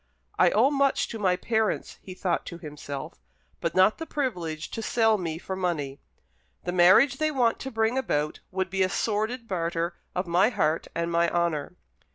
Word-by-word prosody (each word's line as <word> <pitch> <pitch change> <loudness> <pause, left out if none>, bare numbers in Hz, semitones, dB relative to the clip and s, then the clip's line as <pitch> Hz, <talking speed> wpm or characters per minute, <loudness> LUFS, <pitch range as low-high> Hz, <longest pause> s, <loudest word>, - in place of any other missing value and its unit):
"I - - +6
owe 245 +7 +3
much 280 -1 +2
to 225 - -6
my 185 -3 +2
parents," 220 +2 -1
he 185 - -9
thought 180 -2 -1
to 170 - -6
himself, 145 -4 -7 0.4
"but - - -2
not 190 +3 +4
the 325 - -5
privilege 175 - -3
to 225 - -4
sell 225 -1 +2
me 165 -3 -3
for 190 +2 -5
money. 155 -7 -2 0.6
The 175 - -2
marriage 185 +10 +6
they 310 +1 +1
want 250 -6 +1
to 265 - -5
bring 225 +1 +1
about 150 - -1
would 190 0 -2
be 190 0 0
a 185 - +3
sordid 220 +4 -1
barter 170 -2 -1 0.2
of 180 +1 -1
my 180 +5 +3
heart 160 -9 0
and 170 0 -1
my 170 0 +3
honour." 170 -2 -1
185 Hz, 185 wpm, -27 LUFS, 170-225 Hz, 0.6 s, I